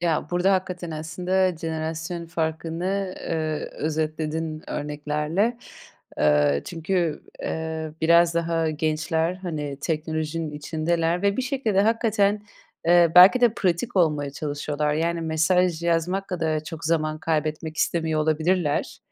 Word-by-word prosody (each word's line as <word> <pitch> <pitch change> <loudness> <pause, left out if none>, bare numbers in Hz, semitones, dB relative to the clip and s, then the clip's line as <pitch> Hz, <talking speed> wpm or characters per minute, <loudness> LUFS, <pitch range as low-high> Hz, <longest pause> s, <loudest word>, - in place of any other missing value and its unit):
Ya, 165 -3 0
burada 180 +2 +2
hakikaten 180 -2 -2
aslında 180 +3 0
jenerasyon 160 +1 -4
farkını, 170 +4 -2
eee, 155 -2 -3
özetledin 155 0 -2
örneklerle. 150 +10 -1 0.6
Eee, 75 -1 +3
çünkü, 170 -1 -1 0.2
eee, 160 -1 -3
biraz 170 +1 +5
daha 165 -1 0
gençler, 160 +2 0
hani, 155 -7 -5
teknolojinin 160 0 -2
içindeler 165 +4 -1
ve 200 0 +2
bir 260 - 0
şekilde, 255 -7 0
hakikaten, 210 -2 +2 0.4
eee, 170 -1 +5
belki 185 +8 +9
de 240 -3 +4
pratik 190 +4 -1
olmaya 150 -5 +2
çalışıyorlar. 150 +1 -2
Yani 170 +1 0
mesaj 165 +2 +1
yazmak 170 +3 0
kadar 160 -4 -1
çok 165 0 -7
zaman 155 -1 0
kaybetmek 155 0 -2
istemiyor 160 -2 0
olabilirler. 160 0 0
165 Hz, 115 wpm, -24 LUFS, 155-180 Hz, 0.6 s, belki